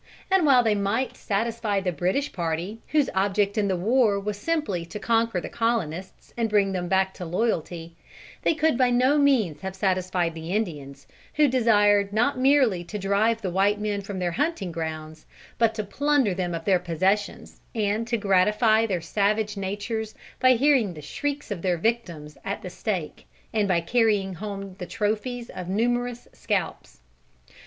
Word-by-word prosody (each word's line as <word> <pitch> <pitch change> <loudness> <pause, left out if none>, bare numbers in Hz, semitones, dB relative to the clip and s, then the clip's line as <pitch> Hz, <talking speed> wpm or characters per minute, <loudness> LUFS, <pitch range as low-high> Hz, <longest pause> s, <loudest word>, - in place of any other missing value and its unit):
And 380 -5 +4
while 255 -3 +6
they 220 -2 +3
might 205 +6 -1
satisfy 220 -1 -1
the 190 -2 -1
British 185 - -1
party, 175 +6 -3
whose 295 -3 +2
object 200 +1 +1
in 210 -2 +1
the 190 - +1
war 215 +2 +2
was 205 +1 -3
simply 205 - -1
to 170 +5 -8
conquer 230 -2 +1
the - - -6
colonists 190 -7 -3
and 230 -2 0
bring 200 -2 +2
them 180 -2 -2
back 190 +1 +1
to 185 - -8
loyalty, 170 -3 -2 0.5
they 330 - +2
could 310 -4 +1
by 255 -1 +4
no 255 +4 +3
means 250 - +2
have 190 0 -5
satisfied 185 -3 0
the 165 +2 -6
Indians, 145 -10 -4 0.3
who 300 -1 +5
desired 205 -5 +3
not 240 +6 +2
merely 260 -9 +3
to 190 +5 -6
drive 210 +3 +1
the 185 - -2
white 200 +3 +2
men 210 -1 -1
back 195 - -10
from 200 - -5
their 180 -1 -1
hunting 275 - -1
grounds, 155 -1 -6 0.3
but 230 -1 +3
to 215 - -2
plunder 280 -1 +1
them 175 -2 -2
of 165 - -6
their 190 -3 +3
possessions 185 +4 -1
and 215 +1 0
to 235 0 0
gratify 210 +3 +3
their 185 -5 -1
savage 210 +3 0
natures 205 +3 -4 0.2
by 255 0 +6
hearing 250 - +2
the 150 - -9
shrieks 285 - -4
of 190 -5 -3
their 180 -1 +1
victims 170 -8 -2
at 200 - -4
the 180 - -6
stake 180 -5 -4 0.3
and 210 -2 +1
by 180 -3 +2
carrying 205 0 +1
home 195 0 -6
the 180 - -5
trophies 225 +5 -2
of 180 -1 -7
numerous 240 +4 -1
scalps. - - -3
205 Hz, 175 wpm, -25 LUFS, 185-230 Hz, 0.5 s, while